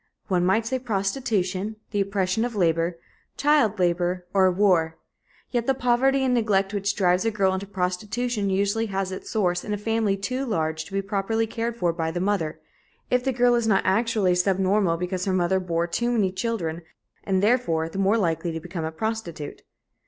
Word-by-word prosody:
One 180 -2 +2
might 195 +5 +2
say 260 +3 -1
prostitution, 205 -3 -1 0.2
the 205 -2 +1
oppression 195 +1 0
of 240 -2 -3
labor, 170 -2 +1 0.4
child 280 -8 +3
labor, 175 0 0
or 190 -2 +4
war. 175 -4 +2 0.5
Yet 240 -2 -1
the 270 - +3
poverty 265 +2 +2
and 255 - +2
neglect 205 -4 +1
which 200 0 -1
drives 180 -1 +2
a 225 - +2
girl 195 -3 +1
into 190 +1 -4
prostitution 200 +4 -2
usually 200 +4 +1
has 195 -1 -2
its 185 - -7
source 180 -4 0
in 210 - -3
a - - -1
family 215 -1 0
too 255 +7 -2
large 160 -9 -1
to 195 - -13
be 195 0 0
properly 205 +3 0
cared 230 +1 -3
for 175 -5 +1
by 165 -1 -2
the 170 +2 -3
mother, 175 -5 -1 0.5
if 250 0 +2
the 265 - +1
girl 245 -1 +3
is 235 -2 +1
not 195 -3 +3
actually 205 -1 +2
subnormal 190 0 +2
because 180 +1 -3
her 190 - 0
mother 185 +1 +2
bore 170 -2 -1
too 235 +8 -1
many 210 -6 +1
children, 185 -5 -3 0.4
and, 190 -1 0
therefore, 205 -9 +2
the 180 +4 -6
more 195 +3 +3
likely 170 -3 0
to 165 - -4
become 170 0 -6
a 160 - -3
prostitute. 175 -5 -4
195 Hz, 190 wpm, -25 LUFS, 180-225 Hz, 0.5 s, or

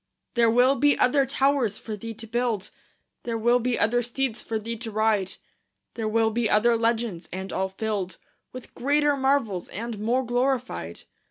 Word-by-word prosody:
There 235 -1 +4
will 245 +4 +5
be 290 +1 +3
other 270 +2 +3
towers 270 -6 +1
for 220 - -6
thee 225 +2 -7
to 225 +1 -9
build; 230 -3 -2 0.5
There 230 -1 -3
will 240 +2 +3
be 245 0 0
other 240 +3 +2
steeds 240 0 -2
for 225 - -3
thee 230 +2 -4
to 225 +1 -5
ride; 215 -3 +1 0.6
There 225 -2 -3
will 220 0 +2
be 230 -1 0
other 230 +3 +4
legends, 225 -5 -1
and 190 0 -5
all 190 0 -1
filled 195 -2 -3 0.3
With 255 -1 -10
greater 290 +2 +2
marvels 265 -9 0
and 225 +1 -5
more 245 +5 0
glorified. 245 - -1
230 Hz, 170 wpm, -25 LUFS, 215-250 Hz, 0.6 s, will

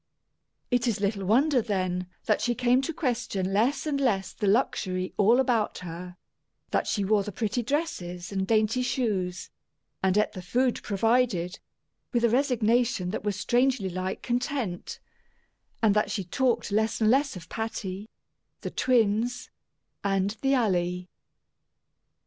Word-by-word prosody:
It 245 0 +2
is 220 -3 0
little 200 -1 -1
wonder, 255 +6 +3
then, 185 -4 -2 0.2
that 215 - +2
she 240 0 +1
came 250 +1 +3
to 270 - -2
question 235 - -2
less 255 +8 +1
and 285 -2 -1
less 200 -8 0
the 210 - -2
luxury 185 -4 0
all 220 +5 +4
about 240 -5 +1
her; 175 +1 -8 0.5
that - - +1
she 200 -3 0
wore 210 +1 +3
the 210 +1 -5
pretty 220 +4 -1
dresses 210 - -3
and 190 -1 -1
dainty 220 +2 +2
shoes, 200 -8 -1 0.5
and 190 +1 +2
ate 210 - +2
the 185 - -7
food 245 +7 0
provided, 205 -4 +1 0.5
with 240 -1 +1
a 235 - +4
resignation 240 -6 +2
that 215 - -4
was 205 -1 -1
strangely 245 -3 +2
like 185 +1 -4
content; 245 -6 -2 0.8
and 215 -2 +5
that 210 +1 +1
she 195 - -2
talked 235 +4 0
less 220 +2 +1
and 220 -1 +4
less 270 -1 +2
of 170 -2 -9
Patty, 210 -2 -5 0.5
the - - -4
twins, 240 0 +1 0.5
and 195 0 +1
the 275 0 +3
Alley. 180 -6 0
215 Hz, 145 wpm, -27 LUFS, 190-245 Hz, 0.8 s, and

